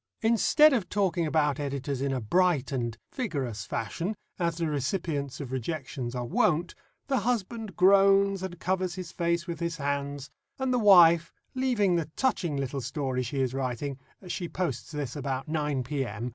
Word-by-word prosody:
Instead 235 +7 +5
of 220 -8 0
talking 185 -5 +1
about 150 -2 +1
editors 140 -1 -3
in 140 0 0
a 130 - -1
bright 155 - +2
and 120 -4 -2 0.2
vigorous 140 - -3
fashion, 170 - -3 0.2
as 170 -2 0
the 170 - -1
recipients 145 -1 -2
of 135 -4 -6
rejections 130 -2 -4
are 125 -1 -2
wont, 165 +7 +1 0.3
the 270 -2 +1
husband 225 -3 -2
groans 195 +1 +5
and 180 -2 -6
covers 185 -1 -1
his 185 -3 -6
face 170 0 0
with 170 -3 -5
his 170 -1 -2
hands, 140 -1 -3 0.3
and 265 -1 0
the 250 - +2
wife, 170 -5 +7 0.2
leaving 235 -9 +2
the 160 -2 -2
touching 185 - 0
little 135 0 -2
story 130 0 -2
she 130 +3 -2
is 130 -1 0
writing 135 +1 -3 0.3
she 175 -1 -4
posts 170 -10 -3
this 145 -5 -4
about 135 -1 -3
9 150 -4 -1
p.m. 125 -4 -3
155 Hz, 165 wpm, -28 LUFS, 135-185 Hz, 0.3 s, wife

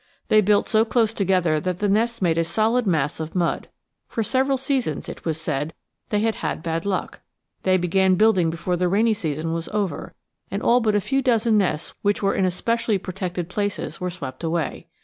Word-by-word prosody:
They 215 - +6
built 205 0 +3
so 220 0 +4
close 225 -1 +1
together 185 -6 +2
that 180 +2 -2
the 205 - 0
nests 225 +2 +1
made 165 -2 +2
a - - +3
solid 220 +7 +1
mass 150 -5 0
of 160 +2 -5
mud. 175 -2 0 0.4
For 225 - -2
several 265 +3 +1
seasons, 260 - -1
it - - -9
was 160 -1 -1
said, 155 -1 -3 0.3
"they 210 -1 +1
had 220 -7 -1
bad 165 +2 -2
luck." 190 -2 -2 0.4
They 185 0 +3
began 185 +1 +3
building 190 -4 +4
before 170 +2 -2
the 180 +1 +1
rainy 215 +5 +3
season 160 -5 -3
was 165 0 -4
over, 205 -3 -3 0.3
and - - -3
all 245 - +5
but 215 -3 +1
a 205 - +3
few 270 +6 0
dozen 230 -3 +2
nests 160 -6 -1
which 205 0 0
were 195 - +2
in 190 - +1
especially 230 +4 0
protected 180 -2 -4
places 205 0 -3
were 180 - -1
swept 140 -6 -7
away. 165 0 -2
190 Hz, 195 wpm, -23 LUFS, 170-220 Hz, 0.4 s, They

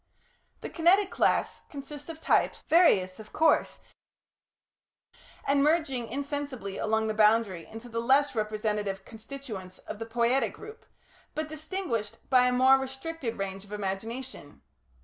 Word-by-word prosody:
The - - -5
Kinetic 375 +4 +4
class - - +1
consists 290 +1 -9
of 320 -1 -7
types, - - +1
various, 200 - +4
of 215 0 -11
course, 320 +1 +2 1.6
and 280 0 +3
merging 290 -6 +1
insensibly 280 -6 -4
along 220 0 +1
the 215 - -1
boundary 210 -5 +3
into 225 +2 -10
the 230 -1 -3
less 275 +4 +3
representative 210 -3 -2
constituents 220 -5 -8
of 215 - -9
the 225 - -5
Poietic 235 +3 +1
group, 440 +1 -12 0.5
but 310 0 -3
distinguished 310 - -3
by 250 -1 +6
a - - +2
more 260 +2 +5
restricted 265 -1 -5
range 195 -1 -4
of 205 - -17
imagination. 210 - -5
240 Hz, 130 wpm, -28 LUFS, 215-285 Hz, 1.6 s, by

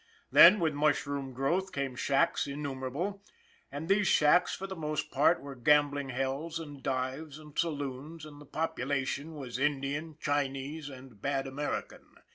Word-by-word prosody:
Then, 170 +9 +9
with 160 -3 +1
mushroom 145 -2 0
growth, 170 +10 0
came 135 -2 -3
shacks 135 +2 +1
innumerable; 140 +7 -4 0.5
and 150 +3 -5
these 195 +1 +3
shacks, 155 +4 +4
for 195 - -6
the 190 0 -6
most 155 -2 -3
part, 155 +5 +3
were 140 0 -7
gambling 145 +1 +2
hells 135 +5 -2
and 145 -4 -9
dives 135 +3 -3
and 150 -2 -14
saloons, 150 0 -3
and 150 -1 -12
the 145 - -13
population 145 0 -2
was 130 -4 -6
Indian, 145 +2 -1
Chinese 145 +1 -2
and 130 -6 -12
bad 135 -1 -1
American. 140 +2 -5
145 Hz, 145 wpm, -31 LUFS, 135-155 Hz, 0.5 s, Then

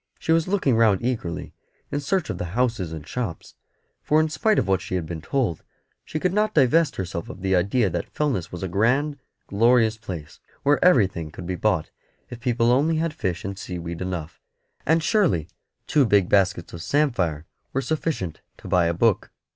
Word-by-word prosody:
She - - -2
was 165 +1 +3
looking 185 - +2
round 110 -4 +3
eagerly 110 -10 -3 0.4
in 145 - -1
search 160 +4 -1
of - - -6
the 90 +4 -5
houses 115 -9 0
and 80 -2 -7
shops, 115 -7 -5 0.5
for 155 - +3
in 155 0 +2
spite 215 +7 +1
of 100 - +1
what 95 -2 +2
she 95 - -4
had 90 -3 -1
been 80 -1 -6
told, 105 - -1 0.4
she 155 - -4
could 180 +2 0
not 215 +1 +1
divest 150 +2 +4
herself 85 -3 -4
of 95 - -9
the 95 -1 +2
idea 100 +6 +2
that 85 -2 -3
Fellness 135 - -1
was 90 +1 -6
a - - -1
grand, 135 - +1 0.3
glorious 115 +1 +3
place, 85 -7 -8 0.2
where 145 +1 +3
everything 95 - +3
could 85 +3 -9
be 90 - -2
bought 90 -3 0 0.4
if 120 - -7
people 120 -1 +2
only 150 +6 +3
had 160 0 -1
fish 90 -4 -3
and 95 0 -5
seaweed 85 -3 -6
enough; 90 -4 -5 0.5
and 160 +1 +3
surely 160 - +2 0.4
two 145 - +3
big 100 -6 +3
baskets 95 -3 +2
of 85 - -7
samphire 90 - 0 0.3
were 135 - 0
sufficient 135 - -2 0.2
to - - -11
buy 90 -2 +3
a 85 - 0
book. 110 +2 +2
110 Hz, 190 wpm, -24 LUFS, 90-145 Hz, 0.5 s, divest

